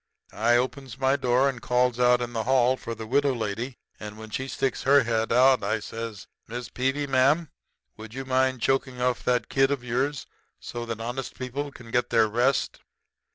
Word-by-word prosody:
I 120 +3 +3
opens 130 -1 -3
my 135 +1 +2
door 130 0 +2
and 130 -3 -3
calls 125 0 +1
out 125 0 +4
in 120 0 -6
the 110 -1 -2
hall 130 0 +3
for 115 -2 -6
the 110 0 -7
widow 140 +3 +2
lady, 115 +3 -4 0.2
and 105 0 -8
when 110 0 -10
she 130 +4 -3
sticks 135 0 -2
her 140 0 +5
head 115 -1 -1
out, 130 0 +5
I 105 +3 0
says: 115 -1 -7 0.2
'Mrs. 120 +1 -6
Peevy, 135 +3 0
ma'am, 140 +4 +2 0.5
would 110 +1 -10
you 135 0 -5
mind 130 -1 +1
choking 130 -1 0
off 125 0 0
that 125 -2 +1
kid 135 0 +2
of 140 -3 -2
yours 130 +3 -1 0.3
so 120 -1 -6
that 115 -1 -4
honest 120 +4 -5
people 140 +3 -4
can 115 -4 -13
get 120 0 +1
their 115 -2 +4
rest?' 120 +5 0
125 Hz, 195 wpm, -26 LUFS, 115-135 Hz, 0.5 s, her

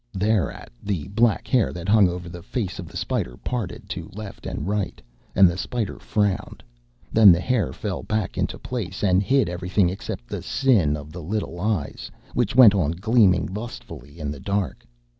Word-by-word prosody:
Thereat 105 0 0
the 95 -7 -3
black 110 +2 +2
hair 125 -6 +2
that 85 +1 -6
hung 100 -2 +5
over 90 0 -5
the 85 0 -8
face 100 -1 -4
of 90 - -6
the - - -8
spider - - -2
parted 120 -7 -4
to - - -5
left 105 -2 -8
and - - -4
right, 100 -2 -2 0.4
and 95 -1 +8
the 85 +2 -2
spider 115 -1 -3
frowned; 105 -3 -1 0.5
then 110 -3 +9
the 85 - +4
hair 110 - 0
fell - - -4
back 110 -3 -2
into - - -2
its - - -19
place, 105 -7 -4
and 95 -1 +4
hid 135 +5 +2
everything 90 +1 +1
except 90 -9 -6
the - - -5
sin 100 - +2
of 75 +1 -10
the 85 +2 -7
little 90 0 -3
eyes 95 -7 -2 0.2
which 120 -2 0
went 120 -6 +9
on 85 -6 +1
gleaming 100 -1 +3
lustfully 105 -8 -8
in 75 -2 -3
the 75 - -7
dark. 100 +5 -2
95 Hz, 185 wpm, -24 LUFS, 85-110 Hz, 0.5 s, then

